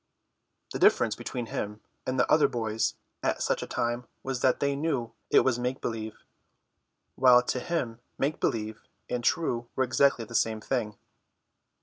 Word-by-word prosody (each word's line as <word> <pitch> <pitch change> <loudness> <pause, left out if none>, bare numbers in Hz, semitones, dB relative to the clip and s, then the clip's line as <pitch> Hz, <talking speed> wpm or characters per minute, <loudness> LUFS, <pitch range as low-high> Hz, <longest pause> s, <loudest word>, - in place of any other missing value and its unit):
The - - -3
difference - - +4
between 120 -2 -4
him 105 -1 -4 0.3
and 130 0 -1
the - - +4
other 150 -2 +5
boys 110 -3 -1 0.3
at - - 0
such - - 0
a - - -5
time 120 +1 -2 0.2
was 130 -2 -3
that 130 - +3
they 140 0 +1
knew 140 -6 -1 0.2
it - - +6
was 125 -2 +1
make 125 +2 -2
believe, 110 -2 -5 0.9
while 125 -1 +6
to 125 - -1
him 125 -7 -2 0.2
make 145 +3 0
believe 110 -1 -1 0.3
and 125 -1 -1
true 120 -6 0
were 130 - +2
exactly 130 -1 +3
the 115 - -12
same 110 -1 +1
thing. 110 -2 -2
125 Hz, 160 wpm, -28 LUFS, 115-130 Hz, 0.9 s, it